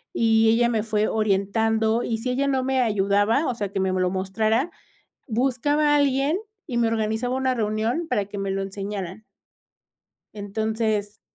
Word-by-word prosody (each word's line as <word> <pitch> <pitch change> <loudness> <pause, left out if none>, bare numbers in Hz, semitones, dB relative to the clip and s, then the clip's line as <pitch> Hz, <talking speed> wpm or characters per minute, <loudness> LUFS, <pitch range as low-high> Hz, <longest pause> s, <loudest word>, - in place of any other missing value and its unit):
y 225 -1 +4
ella 235 +1 +3
me 220 -3 0
fue 215 -1 0
orientando, 220 +2 +1
y 225 -1 -2
si 250 +3 -3
ella 270 +3 0
no 265 -2 +1
me 265 0 +1
ayudaba, 205 +5 +2
o 250 - -1
sea, 205 -3 -3
que 195 - -2
me 190 0 +1
lo 185 -1 0
mostrara, 215 - 0 0.6
buscaba 270 +5 +1
a - - +5
alguien 280 +4 +2 0.3
y 240 - -2
me 235 -1 +3
organizaba 225 +3 -1
una 260 0 +1
reunión 225 +7 -1
para 205 - 0
que 200 +1 -8
me 195 0 -2
lo 195 0 -1
enseñaran. 195 0 -6 1.1
Entonces, 215 0 -2
220 Hz, 165 wpm, -24 LUFS, 205-250 Hz, 1.1 s, a